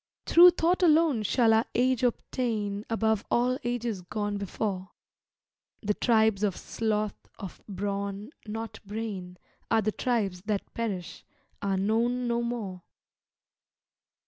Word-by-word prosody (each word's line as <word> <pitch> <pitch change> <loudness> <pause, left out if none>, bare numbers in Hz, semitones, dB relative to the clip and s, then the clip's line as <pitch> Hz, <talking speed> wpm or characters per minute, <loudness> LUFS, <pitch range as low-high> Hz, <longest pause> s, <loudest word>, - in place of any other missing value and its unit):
Through 350 +2 +9
thought 350 +3 +2
alone 315 -7 +4
shall 225 +2 +3
our 220 +1 +3
Age 255 0 +2
obtain 220 -4 -1
Above 220 -2 +1
all 250 +2 +2
Ages 240 -4 -2
gone 205 +2 -3
before; 195 -1 -3 0.9
The 210 0 +1
tribes 220 -3 +3
of 205 -3 0
sloth, 215 -2 -1 0.2
of 195 -4 -8
brawn, 200 +3 -3 0.2
not 225 +1 -5
brain, 200 -4 -5 0.3
Are 225 -1 +3
the 215 - +1
tribes 205 -7 -1
that 210 -2 -2
perish, 200 -7 -4 0.4
are 195 -1 0
known 235 +5 +1
no 235 0 +1
more. 220 -6 -4
220 Hz, 120 wpm, -28 LUFS, 200-240 Hz, 0.9 s, Through